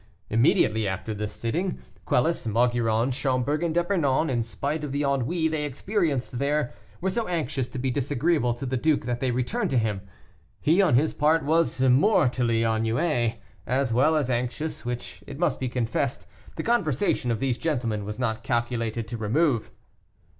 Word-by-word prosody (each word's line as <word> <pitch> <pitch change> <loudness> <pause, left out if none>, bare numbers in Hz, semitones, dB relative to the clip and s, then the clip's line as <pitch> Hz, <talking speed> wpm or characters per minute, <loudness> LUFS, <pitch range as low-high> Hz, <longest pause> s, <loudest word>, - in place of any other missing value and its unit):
Immediately 110 -1 +3
after 100 +3 -3
the 105 0 -3
sitting, 160 - -2 0.3
Quelus, 125 +1 +1
Maugiron, 115 +1 +2
Schomberg, 135 +2 0
and 170 -1 0
D'Epernon, 165 -5 +1
in 120 -2 +1
spite 140 +7 -3
of 145 - -4
the 140 +1 -1
ennui 140 +4 +1
they 155 -1 -1
experienced 145 - -1
there, 145 -1 0 0.3
were 190 +1 0
so 230 +2 -1
anxious 145 -7 -2
to - - -7
be 130 +1 -1
disagreeable 140 -1 +1
to 120 - -6
the 130 0 -1
duke 150 0 +1
that 120 0 -2
they 130 - 0
returned 125 0 -1
to 130 - +1
him. 110 -4 0 0.6
He, 165 +6 +3
on 185 -11 +4
his 150 +5 +2
part, 155 0 +2
was 160 -2 +2
mortally 130 - +3
ennuyé, 115 +2 +1 0.3
as 130 -1 +1
well 145 +7 +4
as 140 -4 +1
anxious, 125 +6 -2
which, 120 0 -6
it 140 - -7
must 160 -5 0
be 130 - -2
confessed, 125 +2 -2 0.3
the - - -4
conversation 175 - +1
of 115 -2 0
these 130 -3 -1
gentlemen 120 -9 -1
was 105 +1 -5
not 115 -3 -1
calculated 115 -1 -1
to 120 - -4
remove. 120 +3 +1
130 Hz, 170 wpm, -26 LUFS, 120-155 Hz, 0.6 s, on